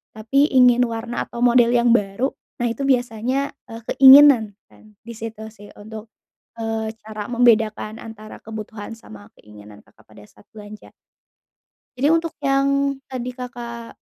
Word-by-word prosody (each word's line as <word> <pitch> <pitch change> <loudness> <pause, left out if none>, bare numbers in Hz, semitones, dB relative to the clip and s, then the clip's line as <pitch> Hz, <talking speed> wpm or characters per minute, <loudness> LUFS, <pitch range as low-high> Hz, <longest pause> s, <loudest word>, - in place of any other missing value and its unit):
tapi 275 +7 +1
ingin 250 -2 +4
warna 230 +1 -5
atau 240 0 -5
model 240 -1 +4
yang 240 0 +2
baru, 210 +4 0 0.3
nah, 245 - -2
itu 235 - -7
biasanya 250 +2 -1 0.2
e - - -10 0.2
keinginan 265 -6 +7
kan, 215 -1 -22
di 235 - -9
situ 225 -1 -8
sih 205 -1 -15
untuk, 215 +1 -10 0.5
eee, 225 -1 -3
cara 215 -1 -7
membedakan 225 -2 +1
antara 215 -1 -11
kebutuhan 220 0 -9
sama 105 - -14
keinginan 105 0 -16
Kakak 110 - -26
pada 105 -1 -16
saat 105 0 -23
belanja. 210 0 -12 1.1
Jadi 270 +3 +1
untuk 330 +1 +1
yang 275 0 0 0.2
tadi 250 -1 -5
Kakak 235 -2 -9
230 Hz, 140 wpm, -20 LUFS, 215-250 Hz, 1.1 s, keinginan